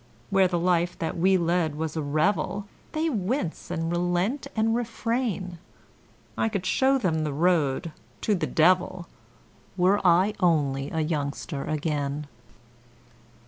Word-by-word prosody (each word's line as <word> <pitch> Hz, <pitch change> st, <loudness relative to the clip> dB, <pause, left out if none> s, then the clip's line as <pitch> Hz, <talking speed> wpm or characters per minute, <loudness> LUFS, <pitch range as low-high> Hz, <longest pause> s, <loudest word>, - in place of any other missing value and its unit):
Where 195 Hz, -1 st, +5 dB
the 175 Hz, -1 st, -1 dB
life 175 Hz, 0 st, +1 dB
that 165 Hz, -, -3 dB
we 190 Hz, +3 st, +3 dB
led 170 Hz, -3 st, 0 dB
was 160 Hz, 0 st, -3 dB
a 160 Hz, -, -1 dB
revel 155 Hz, +7 st, 0 dB, 0.3 s
They 315 Hz, +1 st, 0 dB
'wince 215 Hz, -, -2 dB
and 165 Hz, +1 st, -2 dB
relent 175 Hz, +9 st, 0 dB
and 220 Hz, 0 st, +2 dB
refrain' 230 Hz, -6 st, -2 dB, 0.8 s
I 225 Hz, -, +1 dB
could 200 Hz, -4 st, -3 dB
show 265 Hz, +7 st, +3 dB
them 165 Hz, -10 st, 0 dB
the 150 Hz, -, -1 dB
road 160 Hz, -1 st, +1 dB, 0.3 s
to 215 Hz, -, +1 dB
the 185 Hz, -, -1 dB
devil, 180 Hz, +1 st, +2 dB, 0.7 s
Were 185 Hz, +3 st, +3 dB
I 185 Hz, +3 st, +4 dB
only 145 Hz, -5 st, +1 dB
a 160 Hz, -, -1 dB
youngster 145 Hz, -1 st, -3 dB
again. 150 Hz, -1 st, -2 dB
175 Hz, 135 wpm, -26 LUFS, 155-200 Hz, 0.8 s, Where